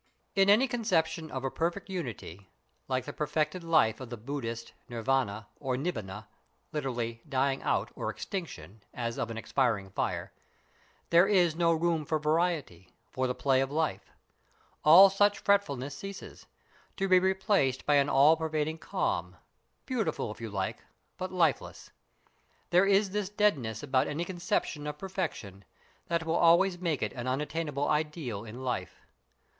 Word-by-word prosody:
In 195 Hz, 0 st, +4 dB
any 225 Hz, +6 st, +6 dB
conception 175 Hz, -9 st, 0 dB
of 130 Hz, -1 st, -5 dB
a 135 Hz, -, -1 dB
perfect 170 Hz, +4 st, -2 dB
unity, 115 Hz, -, -6 dB, 0.4 s
like 130 Hz, -1 st, -1 dB
the -, -, -6 dB
perfected 155 Hz, +3 st, -1 dB
life 155 Hz, -10 st, +3 dB
of 130 Hz, -3 st, -8 dB
the 120 Hz, -, -6 dB
Buddhist, 115 Hz, -1 st, -5 dB, 0.2 s
Nirvana 115 Hz, -3 st, -1 dB
or 130 Hz, -3 st, -2 dB
Nibbana 110 Hz, -, -4 dB, 0.5 s
(literally 120 Hz, -6 st, -3 dB
"dying 135 Hz, 0 st, +1 dB
out" -, -, 0 dB
or -, -, -3 dB
"extinction" 110 Hz, -, -6 dB
as 115 Hz, -1 st, -3 dB
of 115 Hz, -, -2 dB
an 115 Hz, -, -5 dB
expiring 115 Hz, -5 st, 0 dB
fire), -, -, -3 dB, 0.8 s
there 170 Hz, +3 st, +6 dB
is 180 Hz, -6 st, +3 dB
no 170 Hz, 0 st, +3 dB
room 165 Hz, -1 st, +1 dB
for 160 Hz, 0 st, 0 dB
variety, 150 Hz, -, -1 dB, 0.2 s
for 130 Hz, 0 st, -1 dB
the 125 Hz, -, -2 dB
play 135 Hz, -2 st, +2 dB
of 135 Hz, -, -1 dB
life; 155 Hz, +1 st, -2 dB, 0.7 s
all 175 Hz, +6 st, +10 dB
such 205 Hz, +1 st, +3 dB
fretfulness 145 Hz, -9 st, 0 dB
ceases, 195 Hz, +6 st, -9 dB, 0.5 s
to 195 Hz, -, 0 dB
be 185 Hz, -1 st, +6 dB
replaced 190 Hz, -, +1 dB
by 145 Hz, -1 st, +4 dB
an 140 Hz, 0 st, +3 dB
all 145 Hz, +4 st, +6 dB
pervading 160 Hz, 0 st, -2 dB
calm, -, -, -2 dB, 0.5 s
beautiful, 225 Hz, -, -2 dB
if 110 Hz, -, -11 dB
you 115 Hz, -, -4 dB
like, 95 Hz, -2 st, -3 dB, 0.4 s
but 185 Hz, 0 st, -4 dB
lifeless. 170 Hz, -6 st, 0 dB, 0.8 s
There 180 Hz, +3 st, +5 dB
is 200 Hz, 0 st, +3 dB
this 205 Hz, -1 st, -2 dB
deadness 145 Hz, -, 0 dB
about 130 Hz, -2 st, +1 dB
any 160 Hz, +4 st, -2 dB
conception 170 Hz, -4 st, -2 dB
of 150 Hz, -, -5 dB
perfection 150 Hz, -, -5 dB, 0.4 s
that 170 Hz, -1 st, -1 dB
will 165 Hz, +1 st, +1 dB
always 175 Hz, +2 st, +4 dB
make 165 Hz, -5 st, -1 dB
it -, -, -2 dB
an 125 Hz, 0 st, -5 dB
unattainable 145 Hz, +2 st, -2 dB
ideal 150 Hz, -, -2 dB
in 120 Hz, +4 st, -8 dB
life. 120 Hz, -8 st, -4 dB
150 Hz, 150 wpm, -30 LUFS, 125-175 Hz, 0.8 s, all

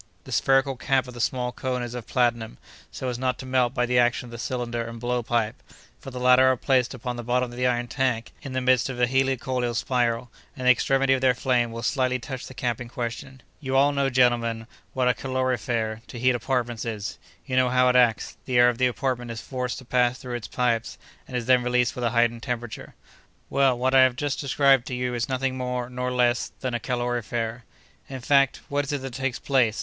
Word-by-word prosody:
"The -, -, -11 dB
spherical 135 Hz, 0 st, +2 dB
cap 135 Hz, 0 st, +1 dB
of 125 Hz, -, -9 dB
the 120 Hz, -, -5 dB
small 125 Hz, +1 st, -1 dB
cone 125 Hz, -1 st, -3 dB
is 120 Hz, -1 st, -6 dB
of 120 Hz, -2 st, -7 dB
platinum, 120 Hz, -, 0 dB, 0.3 s
so 130 Hz, -, -5 dB
as 120 Hz, -1 st, -4 dB
not 130 Hz, 0 st, 0 dB
to 130 Hz, -, -8 dB
melt 130 Hz, -1 st, +1 dB
by 125 Hz, -, +2 dB
the 125 Hz, 0 st, +2 dB
action 120 Hz, +1 st, +2 dB
of 120 Hz, -, -12 dB
the 120 Hz, -, -8 dB
cylinder 120 Hz, -1 st, -3 dB
and 115 Hz, 0 st, -8 dB
blow 120 Hz, +1 st, -1 dB
pipe, 115 Hz, -2 st, -1 dB, 0.4 s
for -, -, -9 dB
the 125 Hz, -1 st, -7 dB
latter 125 Hz, +1 st, +6 dB
are 130 Hz, -1 st, +3 dB
placed 130 Hz, 0 st, +1 dB
upon 125 Hz, 0 st, -5 dB
the 120 Hz, -, -5 dB
bottom 125 Hz, +1 st, 0 dB
of -, -, -10 dB
the 125 Hz, +1 st, +1 dB
iron 120 Hz, -1 st, 0 dB
tank 125 Hz, -3 st, -1 dB
in 135 Hz, -, -7 dB
the 130 Hz, -, -1 dB
midst 130 Hz, 0 st, +3 dB
of 130 Hz, -, -5 dB
the 125 Hz, -, +3 dB
helicoidal 130 Hz, -1 st, 0 dB
spiral, 120 Hz, -1 st, 0 dB, 0.3 s
and 130 Hz, -, -5 dB
the 125 Hz, -, +8 dB
extremity 135 Hz, +2 st, +2 dB
of 130 Hz, -, 0 dB
their 130 Hz, -1 st, +3 dB
flame 125 Hz, -2 st, +1 dB
will 115 Hz, 0 st, -6 dB
slightly 130 Hz, -1 st, +1 dB
touch 130 Hz, +1 st, -7 dB
the 130 Hz, -, -12 dB
cap 120 Hz, -2 st, -2 dB
in 120 Hz, -, -7 dB
question. 120 Hz, +2 st, -6 dB, 0.2 s
"You 135 Hz, -3 st, -3 dB
all 140 Hz, +2 st, +5 dB
know, 140 Hz, -1 st, +1 dB
gentlemen, 120 Hz, -3 st, +2 dB, 0.3 s
what 130 Hz, -1 st, +1 dB
a 125 Hz, -, +4 dB
calorifere, 120 Hz, -4 st, -2 dB
to -, -, -9 dB
heat 125 Hz, +2 st, +3 dB
apartments, 120 Hz, -2 st, -2 dB
is. 105 Hz, -7 st, -5 dB, 0.3 s
You 130 Hz, -, -3 dB
know 130 Hz, -1 st, +4 dB
how 125 Hz, 0 st, +3 dB
it 125 Hz, -, +3 dB
acts. 120 Hz, -3 st, +2 dB
The 125 Hz, -2 st, 0 dB
air 120 Hz, 0 st, +7 dB
of 120 Hz, -, -3 dB
the 130 Hz, -, +4 dB
apartments 125 Hz, -2 st, -2 dB
is 115 Hz, -, -7 dB
forced 125 Hz, -2 st, -3 dB
to 130 Hz, -, -10 dB
pass 125 Hz, 0 st, +2 dB
through 125 Hz, -1 st, -7 dB
its 120 Hz, -2 st, -4 dB
pipes, 120 Hz, -2 st, -1 dB, 0.3 s
and 125 Hz, -, -3 dB
is 120 Hz, -, -3 dB
then 125 Hz, 0 st, +4 dB
released 125 Hz, 0 st, +1 dB
with 125 Hz, -, -5 dB
a -, -, +3 dB
heightened 115 Hz, 0 st, +1 dB
temperature. 120 Hz, -2 st, -5 dB, 0.6 s
Well, 135 Hz, -3 st, +3 dB
what 130 Hz, +2 st, 0 dB
I 135 Hz, -, +7 dB
have 130 Hz, -1 st, +4 dB
just 145 Hz, +1 st, -2 dB
described 135 Hz, -2 st, +3 dB
to 125 Hz, -, -3 dB
you 125 Hz, 0 st, -2 dB
is 120 Hz, +1 st, -2 dB
nothing 130 Hz, 0 st, -1 dB
more 125 Hz, -1 st, -3 dB
nor 125 Hz, 0 st, -2 dB
less 120 Hz, -1 st, +1 dB
than 130 Hz, -2 st, -2 dB
a 120 Hz, -, -1 dB
calorifere. 120 Hz, -1 st, -3 dB, 0.4 s
"In 130 Hz, -2 st, -6 dB
fact, 140 Hz, +1 st, +3 dB
what 145 Hz, 0 st, 0 dB
is 140 Hz, -, -4 dB
it 140 Hz, -2 st, -3 dB
that 135 Hz, -2 st, -6 dB
takes 135 Hz, 0 st, -2 dB
place? 125 Hz, -6 st, +1 dB
125 Hz, 235 wpm, -25 LUFS, 120-130 Hz, 0.6 s, the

